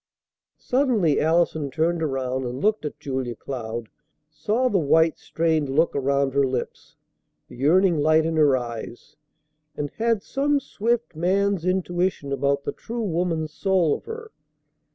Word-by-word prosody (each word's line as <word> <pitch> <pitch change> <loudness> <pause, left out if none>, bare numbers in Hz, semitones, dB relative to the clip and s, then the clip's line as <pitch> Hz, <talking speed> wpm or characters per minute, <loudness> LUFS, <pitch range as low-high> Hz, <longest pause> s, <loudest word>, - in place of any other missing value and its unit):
Suddenly 245 - +1
Allison 160 -2 +1
turned 165 +4 0
around, 130 -3 -1
and 125 +1 -4
looked 215 -2 +1
at 150 - -5
Julia 130 -3 -3
Cloud, 115 -2 -5 0.4
saw 210 +12 0
the 205 -6 +2
white, 160 +1 +3
strained 160 -3 0
look 155 +5 +2
around 140 0 +1
her 140 0 +3
lips, 130 -2 -4 0.5
the - - -13
yearning 170 +5 +3
light 155 +2 +4
in 165 0 -1
her 145 -4 +4
eyes, 120 -1 -7 0.6
and 145 -1 -3
had 225 -2 +1
some 285 +1 +1
swift 235 - -2
man's 190 +2 +1
intuition 180 -5 -1
about 140 +1 0
the - - -2
true 235 0 -5
woman's 165 -4 -1
soul 185 -6 +2
of - - -5
her. 455 0 -8
160 Hz, 145 wpm, -24 LUFS, 140-190 Hz, 0.6 s, light